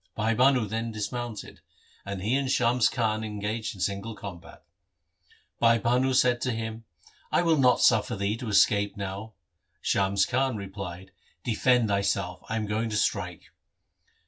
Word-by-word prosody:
Bhai 110 +1 +1
Bhanu 130 0 +4
then 115 +2 -3
dismounted, 110 +1 -5 0.5
and 100 -2 -4
he 110 +5 0
and 135 -1 0
Shams 125 -2 +3
Khan 110 -3 -1
engaged 105 +1 -4
in 95 - -10
single 100 +4 -2
combat. 95 -5 -10 1.0
Bhai 115 0 +5
Bhanu 125 +4 +1
said 125 -1 +3
to 130 - 0
him, 115 0 -5 0.2
' - - -28
I - - +3
will 165 -2 +4
not 130 -4 +4
suffer 110 -3 +3
thee 100 +1 -1
to 115 -1 -5
escape 100 0 +3
now.' 100 +3 -5 0.5
Shams 95 0 +2
Khan 130 0 0
replied, 95 -2 -7 0.2
' - - -39
Defend 125 0 +2
thyself, 100 -2 -1
I 115 - -1
am 110 -1 -1
going 110 +2 -1
to 105 - -1
strike.' 100 - -2
110 Hz, 160 wpm, -27 LUFS, 100-120 Hz, 1.0 s, Bhai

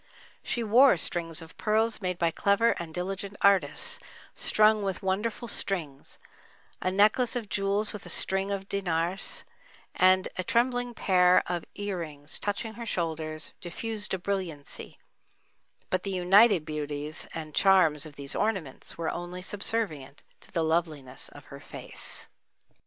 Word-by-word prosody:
She 240 - -1
wore 235 0 +6
strings 165 0 -1
of 160 - -14
pearls 220 +1 +1
made 180 -2 -2
by 170 -1 +1
clever 200 +6 +3
and 170 -2 -6
diligent 195 +4 -4
artists, 200 -1 +3 0.3
strung 215 0 +4
with 195 -1 -3
wonderful 210 +5 -1
strings, 165 -10 -2 0.6
a 185 - +1
necklace 215 +6 +3
of 230 -4 -3
jewels 200 +1 0
with 210 - -7
a - - -7
string 190 +3 +1
of 195 -1 -3
Dinaras, 180 -1 -2 0.5
and 185 0 +4
a 185 - -1
trembling 245 +2 +1
pair 180 -3 +4
of 175 -2 -3
ear 205 -2 -3
rings, 145 -3 -3
touching 210 +2 -2
her 235 +1 -7
shoulders, 160 -4 -3
diffused 210 +3 -3
a - - -3
brilliancy; 180 -6 -5 0.9
but 185 - +1
the 200 - -4
united 190 0 +5
beauties 150 0 -4
and 155 -2 -6
charms 175 -7 +4
of 155 -3 -7
these 140 -1 -4
ornaments 190 -11 -2
were 165 -1 -1
only 175 +1 -6
subservient 195 -9 -3 0.2
to - - -16
the 165 - 0
loveliness 160 -5 -2
of - - -14
her - - -8
face. - - -8
185 Hz, 145 wpm, -28 LUFS, 165-205 Hz, 0.9 s, wore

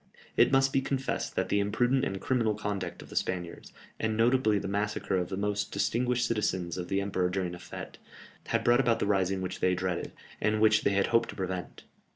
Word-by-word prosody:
It - - +5
must 135 0 +3
be 135 - +3
confessed 135 0 -2
that - - 0
the 100 - +2
imprudent 120 +6 +1
and 95 -5 -3
criminal 115 -3 +1
conduct 105 -2 -4
of - - -15
the - - -9
Spaniards, 90 -2 -3 0.3
and 110 -1 -1
notably 115 -2 +3
the 100 - -3
massacre 100 0 -1
of 90 -2 -1
the 95 - -3
most 100 0 -1
distinguished 125 +1 +1
citizens 95 -6 -1
of 90 -1 -4
the 95 +1 0
empire 95 -2 0
during 90 -1 -2
a 90 - -8
fête, - - -8 0.5
had - - 0
brought 120 +1 +4
about 120 -4 +3
the - - -1
rising 95 -2 +1
which 90 0 -4
they 90 0 +2
dreaded, 90 -1 -2 0.3
and 110 0 +2
which 110 0 +4
they 100 - +2
had 100 0 +3
hoped 115 - +3
to - - -7
prevent. 95 -2 -5
100 Hz, 210 wpm, -29 LUFS, 95-115 Hz, 0.5 s, It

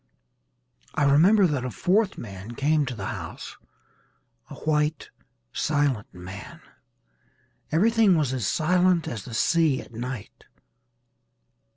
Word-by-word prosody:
I - - +1
remember 175 +9 +5
that 145 -7 0
a 130 - -2
fourth 190 - +1
man 100 +1 -8
came 150 +1 +1
to 125 - -4
the 100 -3 -6
house, - - -7 0.9
a 145 - -9
white 150 +1 -1 0.4
silent 145 -8 0
man. 95 +3 -10 1.1
Everything 210 +2 +4
was 145 -4 0
as 125 -6 -1
silent 180 +1 +2
as 110 -4 -5
the 115 - -7
sea 160 +1 +2
at - - -11
night. 120 -1 -7
145 Hz, 115 wpm, -25 LUFS, 120-170 Hz, 1.1 s, remember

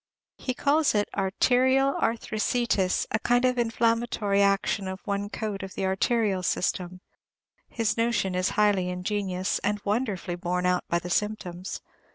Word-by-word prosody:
He 255 - -3
calls 290 -1 +2
it 205 0 +2
arterial 260 +7 +2
arthriticis, 220 -3 0
a 220 - +1
kind 245 +2 +2
of 250 -1 +1
inflammatory 230 -3 +1
action 195 -1 +1
of 190 0 -5
one 200 -1 -2
coat 210 -2 -4
of 190 -1 -8
the 195 - -1
arterial 195 0 +1
system; 180 0 -1 0.7
his 225 -1 -1
notion 230 -5 +1
is 185 +1 +1
highly 205 -4 +3
ingenious, 185 0 -2
and 205 0 -1
wonderfully 200 -6 -1
borne 180 0 -2
out 180 0 +1
by 170 - +1
the 175 +1 -5
symptoms. 185 -3 -2
205 Hz, 145 wpm, -26 LUFS, 185-230 Hz, 0.7 s, highly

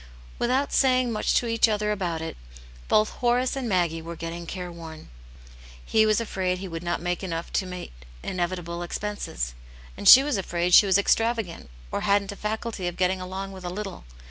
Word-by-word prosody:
Without 260 +4 +1
saying 255 -2 +3
much 215 - 0
to - - +3
each 230 0 +3
other 210 0 0
about 175 -6 -2
it, 165 - -5 0.5
both 215 0 +3
Horace 250 +2 +1
and 260 -4 -3
Maggie 170 -4 +1
were 170 +1 -7
getting 165 +1 -6
careworn. 170 -3 -8 0.8
He 220 -1 +3
was 215 0 +3
afraid 190 -5 -1
he 190 +1 -6
would 165 -2 -6
not 175 -1 -2
make 175 +2 -2
enough 170 -2 -4
to 190 - 0
meet 180 -1 -7 0.3
inevitable 175 -1 -3
expenses, 175 - -4 0.4
and - - +3
she 265 - +11
was 285 -5 0
afraid 175 -1 -1
she 205 - +8
was 190 0 +5
extravagant 225 - 0 0.2
or - - -2
hadn't 200 -1 +2
a/aculty 210 -1 -4
of 175 - -4
getting 185 0 +1
along 190 +1 -5
with 190 -1 -10
a 175 - -3
little. 195 +1 -6
190 Hz, 180 wpm, -25 LUFS, 175-215 Hz, 0.8 s, she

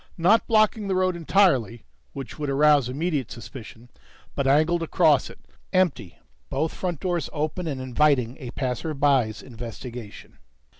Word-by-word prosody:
Not 195 +7 +3
blocking 215 -1 +2
the 190 - 0
road 185 -1 +1
entirely, 160 - +2 0.3
which 135 +2 -8
would 145 -1 -2
arouse 145 -2 +4
immediate 145 -2 -2
suspicion, 120 0 -11 0.4
but 140 -1 -1
angled 155 +5 +3
across 165 - +3
it, - - -13
lights - - -33
out, 185 - -2
empty, 155 - -1 0.3
both 155 +4 -1
front 175 -5 -3
doors 175 -4 -2
open 155 +3 -3
and 140 -4 -3
inviting 130 -1 +1
a 130 -4 -7
passerby's 130 -2 0
investigation. 120 -2 -9
145 Hz, 145 wpm, -24 LUFS, 125-170 Hz, 0.4 s, arouse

